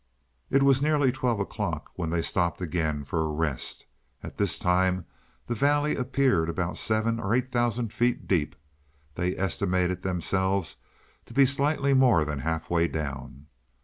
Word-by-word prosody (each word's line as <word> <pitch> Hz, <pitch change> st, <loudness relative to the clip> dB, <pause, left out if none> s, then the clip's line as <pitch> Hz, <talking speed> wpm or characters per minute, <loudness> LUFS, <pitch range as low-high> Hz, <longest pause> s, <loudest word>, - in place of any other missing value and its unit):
It 135 Hz, 0 st, +3 dB
was 135 Hz, -1 st, +4 dB
nearly 145 Hz, -3 st, +3 dB
twelve 125 Hz, -4 st, -1 dB
o'clock 100 Hz, -, -4 dB
when 85 Hz, -3 st, -3 dB
they 85 Hz, 0 st, 0 dB
stopped 85 Hz, -1 st, 0 dB
again 80 Hz, -4 st, -2 dB
for 80 Hz, +2 st, -2 dB
rest. 75 Hz, -3 st, -1 dB, 0.4 s
At -, -, -9 dB
this 100 Hz, -4 st, +1 dB
time 90 Hz, 0 st, +1 dB, 0.4 s
the 120 Hz, -, -2 dB
valley 145 Hz, +5 st, +2 dB
appeared 125 Hz, -10 st, +1 dB
about 85 Hz, +1 st, -2 dB
seven 110 Hz, +1 st, +1 dB
or 105 Hz, +2 st, 0 dB
eight 130 Hz, +1 st, -1 dB
thousand 120 Hz, -2 st, 0 dB
feet 120 Hz, +1 st, 0 dB
deep: 80 Hz, -6 st, 0 dB, 0.6 s
they 90 Hz, +3 st, -2 dB
estimated 90 Hz, -1 st, 0 dB
themselves 95 Hz, 0 st, 0 dB, 0.5 s
to -, -, -13 dB
be 135 Hz, 0 st, +6 dB
slightly 140 Hz, +1 st, +2 dB
more 125 Hz, -, +4 dB
than 75 Hz, -2 st, -3 dB
half 80 Hz, +2 st, -2 dB
way 85 Hz, -1 st, +2 dB
down. 70 Hz, -3 st, -6 dB
95 Hz, 150 wpm, -27 LUFS, 85-125 Hz, 0.6 s, be